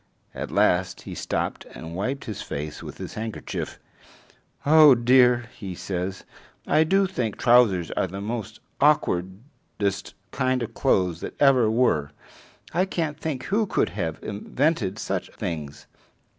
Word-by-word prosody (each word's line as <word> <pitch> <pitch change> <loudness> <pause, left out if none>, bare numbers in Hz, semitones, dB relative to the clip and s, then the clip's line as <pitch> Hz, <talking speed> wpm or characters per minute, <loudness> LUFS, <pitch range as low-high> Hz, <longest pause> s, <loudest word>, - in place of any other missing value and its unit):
At - - -5
last 90 +1 +2
he - - -8
stopped - - -3
and 80 +1 -8
wiped 130 +9 -3
his 110 - -5
face 75 +1 -5
with - - -9
his - - -7
handkerchief. 110 0 -5 0.9
"Oh 150 -2 +8
dear," 125 0 +4
he 95 -4 -7
says, 95 +1 -4 0.4
"I 155 - +4
do 195 +5 +3
think 125 - -3
trousers 115 -8 +4
are - - 0
the 95 +2 -7
most 110 +1 -5 0.2
awkwardest 100 - -1 0.2
kind 130 -1 0
of 115 0 -6
clothes 90 -11 +1
that - - -7
ever 130 -6 +5
were. 95 - +1 0.6
I 180 +3 +2
can't 160 -5 -3
think 145 -5 -3
who 215 +1 0
could - - +1
have 80 -1 -3
invented 110 - -1
such - - -3
things. 75 -5 -5
115 Hz, 140 wpm, -25 LUFS, 95-140 Hz, 0.9 s, Oh